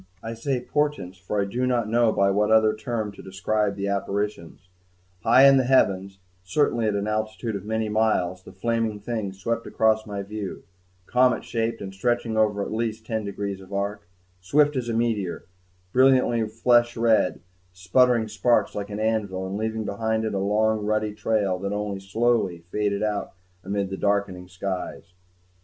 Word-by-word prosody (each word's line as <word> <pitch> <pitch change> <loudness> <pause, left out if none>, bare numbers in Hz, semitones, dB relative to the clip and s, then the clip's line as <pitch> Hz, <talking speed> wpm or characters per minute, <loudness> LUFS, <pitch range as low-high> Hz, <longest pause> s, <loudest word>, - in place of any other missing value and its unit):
I 115 - -4
say 125 +3 -2
"portents," 145 -11 -2
for 95 +3 -3
I 100 - +1
do 125 +6 -1
not 120 -3 +1
know 115 0 +3
by 100 -1 +2
what 105 +2 +2
other 110 -1 +5
term 110 -1 -3
to 100 - -12
describe 100 +2 -1
the 100 0 -3
apparitions; 100 -3 -3 0.5
high 130 +9 +6
in 135 0 +7
the 130 - +3
heavens, 100 -7 +2 0.3
certainly 115 +3 +1
at 105 - 0
an 100 0 -1
altitude 110 +1 -2
of 100 0 -6
many 110 0 -1
miles, 105 -4 +1
the - - -13
flaming 115 +1 -1
thing 110 -2 -3
swept 115 +5 -3
across 110 0 +2
my 100 -1 -4
view, 105 -1 -6 0.4
comet 125 +2 +3
shaped 115 0 -2
and 95 -1 -6
stretching 120 +2 -1
over 105 -2 +2
at - - -5
least 110 0 -2
ten 110 -2 -2
degrees 100 -1 -4
of 95 +1 -15
arc, 100 0 -3 0.3
swift 145 +10 +2
as 125 -2 -2
a - - -1
meteor, 110 -6 -1 0.5
brilliantly 125 -3 +4
flesh 120 +2 +2
red, 115 -5 +2 0.3
sputtering 110 +6 +2
sparks 120 +2 +1
like 100 0 -5
an 105 0 -5
anvil, 105 -4 -1
and 95 +1 -4
leaving 110 +1 -2
behind 110 +2 -1
it 110 - -2
a 100 - 0
long 105 +2 +1
ruddy 110 0 0
trail 100 -4 0
that 100 +1 -3
only 105 -1 -3
slowly 95 -3 0
faded 105 -1 0
out 105 -1 -2 0.3
amid 100 0 -2
the 95 - -3
darkening 100 -3 -1
skies. 95 -1 -5
110 Hz, 175 wpm, -25 LUFS, 100-115 Hz, 0.5 s, in